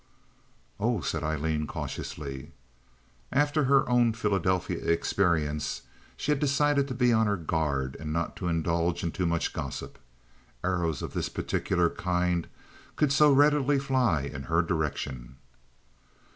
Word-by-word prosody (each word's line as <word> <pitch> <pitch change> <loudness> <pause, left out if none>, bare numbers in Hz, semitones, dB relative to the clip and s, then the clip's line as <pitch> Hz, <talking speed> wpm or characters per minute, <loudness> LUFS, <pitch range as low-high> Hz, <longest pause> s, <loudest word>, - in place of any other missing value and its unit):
"Oh!" 110 -2 +1
said - - -2
Aileen, 75 0 -1
cautiously. 70 +1 -6 0.8
After 145 +1 +2
her 135 0 +4
own 120 -2 +3
Philadelphia 95 -5 0
experience 85 -3 0 0.3
she 150 - -1
had 145 - +1
decided 145 0 +2
to 130 - -4
be 125 -1 +3
on 110 -1 +3
her 100 -1 +1
guard 75 -5 -1
and 75 -1 -5
not 85 +4 -3
indulge 85 0 0
in 85 - -1
too 90 -1 -1
much 85 0 -1
gossip. - - -6 0.6
Arrows 85 -5 -1
of - - -5
this - - -2
particular 90 -2 0
kind 90 -1 0 0.5
could 150 -3 +2
so 150 +1 +6
readily 145 0 +4
fly 130 - +1
in 70 -1 -5
her 80 +1 +3
direction. 70 -7 -3
90 Hz, 130 wpm, -28 LUFS, 80-125 Hz, 0.8 s, so